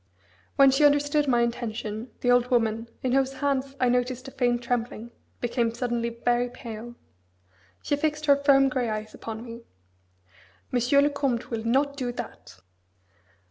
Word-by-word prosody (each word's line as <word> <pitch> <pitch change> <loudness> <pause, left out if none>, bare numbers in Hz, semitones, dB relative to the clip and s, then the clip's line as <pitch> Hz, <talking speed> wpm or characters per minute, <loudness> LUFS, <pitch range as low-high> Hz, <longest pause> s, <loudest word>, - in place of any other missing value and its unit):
When 275 -1 +7
she 270 +3 +2
understood 290 0 +3
my 240 -2 +3
intention, 230 -1 -4
the 245 - +3
old 245 0 +4
woman, 230 -2 +1 0.2
in 255 - 0
whose 270 +1 +2
hands 275 0 -1
I - - 0
had 245 -1 +3
noticed 250 +1 -1
a - - -8
faint 245 -3 0
trembling, 235 -1 -3 0.3
became 235 -1 0
suddenly 235 -1 -1
very 240 +1 0
pale. 235 -1 -9 0.9
She 290 - +1
fixed 300 +1 -1
her 285 -1 +6
firm, 280 -1 +4
grey 255 -3 -1
eyes 215 0 -4
upon 225 +1 -7
me: 230 0 -9 1.1
"Monsieur 250 +3 +3
le 290 - +2
Comte 275 -5 -2
will 225 -1 -3
not 280 +5 +1
do 250 -3 -2
that!" 95 - -9
245 Hz, 160 wpm, -26 LUFS, 235-275 Hz, 1.1 s, When